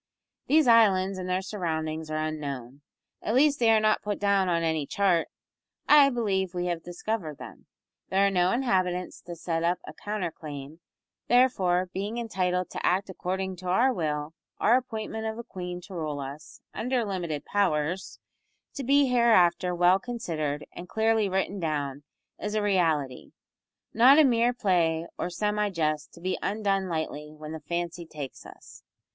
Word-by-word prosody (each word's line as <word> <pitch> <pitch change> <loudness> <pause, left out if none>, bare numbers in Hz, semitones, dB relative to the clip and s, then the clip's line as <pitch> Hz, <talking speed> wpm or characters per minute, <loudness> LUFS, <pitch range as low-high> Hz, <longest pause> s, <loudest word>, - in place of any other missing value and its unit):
These 310 +1 +5
islands 195 -5 +4
and 185 0 -5
their 185 +1 0
surroundings 160 -5 -3
are 155 - -2
unknown 140 -4 -5 0.4
at 220 - -1
least 290 +2 +4
they 230 -2 +4
are 220 -1 +6
not 215 0 +2
put 205 -1 -3
down 200 -2 +2
on 170 -1 +1
any 160 -3 0
chart; 190 -5 +2 0.6
I 290 -2 +7
believe 195 -7 -1
we 175 0 -1
have 175 -2 -2
discovered 175 -3 -4
them. - - -12 0.4
There 195 +1 +3
are 200 - +2
no 180 -1 +2
inhabitants 185 -8 0
to 175 - -8
set 165 0 -2
up 175 +1 +2
a - - -9
counter 205 0 -3
claim; 150 0 -9 0.5
therefore, 185 -8 +3
being 205 +4 -3
entitled 185 -6 -1
to - - -5
act 190 +2 +1
according 190 +1 -3
to 180 +1 -8
our 235 +9 +3
will, 150 -4 -2 0.3
our 230 - +4
appointment 220 -3 -3
of 220 0 -4
a 235 - -6
queen 180 -4 -6
to 190 - -12
rule 155 -4 -3
us 140 +3 -9
under 250 -1 -1
limited 175 -7 -3
powers, 180 -3 0 0.6
to 275 - -5
be 280 +2 +4
hereafter 185 -8 +3
well 180 +2 +4
considered 160 -11 -3
and 180 +1 -9
clearly 220 -2 +2
written 190 +1 -1
down 145 -4 -2 0.4
is 210 +1 -3
a 215 - +1
reality; 160 -10 0 0.6
not 255 +6 +7
a 315 - +8
mere 240 -2 +3
play 170 -8 +1
or - - -1
semi 210 +3 0
jest 155 -5 -1
to 170 - -14
be 185 +1 -2
undone 195 -2 0
lightly 155 -2 -4
when 155 0 -8
the 160 - -5
fancy 170 +1 -4
takes 145 -4 -8
us. - - -14
185 Hz, 165 wpm, -27 LUFS, 160-215 Hz, 0.6 s, a